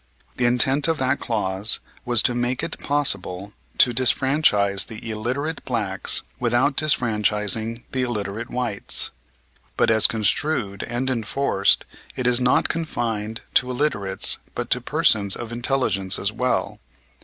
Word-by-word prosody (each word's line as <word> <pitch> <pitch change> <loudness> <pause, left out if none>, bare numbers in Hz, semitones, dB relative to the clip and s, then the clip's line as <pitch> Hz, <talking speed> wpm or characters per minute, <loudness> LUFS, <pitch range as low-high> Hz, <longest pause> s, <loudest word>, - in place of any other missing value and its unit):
The 125 - +2
intent 130 +4 +2
of 165 -1 0
that 130 +1 0
clause 105 -2 0 0.3
was 120 -4 +2
to 125 - +2
make 120 +1 -2
it - - -3
possible 100 -9 0 0.2
to 120 - +5
disfranchise 125 -6 +2
the 115 0 -8
illiterate 130 +9 -3
blacks 105 -7 0 0.2
without 125 +4 +1
disfranchising 110 -4 +1
the 130 - -1
illiterate 110 -2 -4
whites. 120 -5 -1 0.7
But - - +3
as 110 -1 +6
construed 110 -1 -1
and 120 +2 -3
enforced 115 -3 +1 0.3
it 130 - -4
is 125 0 +4
not 125 0 +2
confined 115 -9 -3
to 130 - +3
illiterates 105 -8 +1 0.2
but - - -4
to - - +2
persons 100 -2 +3
of 120 -1 -7
intelligence 120 -6 0
as 100 - -2
well. 125 +3 -2
120 Hz, 130 wpm, -22 LUFS, 105-130 Hz, 0.7 s, as